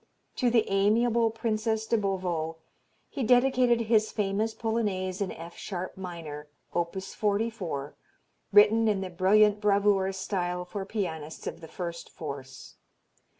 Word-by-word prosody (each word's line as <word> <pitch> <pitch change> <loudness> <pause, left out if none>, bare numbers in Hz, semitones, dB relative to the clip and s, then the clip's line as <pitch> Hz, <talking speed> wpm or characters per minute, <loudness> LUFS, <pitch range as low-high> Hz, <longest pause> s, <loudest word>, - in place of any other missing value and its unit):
To 250 - +3
the 230 -2 +3
amiable 225 +4 +3
Princess 220 0 -1
de 230 - +1
Beauvau 180 -6 -1 0.5
he - - -5
dedicated 245 0 +4
his 220 -1 +2
famous 210 +2 -1
Polonaise 205 -5 -1
in 195 - -1
F 170 +1 -9
sharp 185 -2 -5
minor, 165 -5 -7 0.3
op. 175 +2 -1
44, 200 -7 -2 0.6
written 210 +2 +6
in 205 -3 +1
the 185 -1 -5
brilliant 205 +4 +4
bravura 200 -2 +3
style 180 -2 -2
for 195 +2 -5
pianists 160 -7 -4
of - - -5
the 160 - -9
first 170 -1 -6
force. 140 -4 -8
200 Hz, 130 wpm, -28 LUFS, 180-220 Hz, 0.6 s, written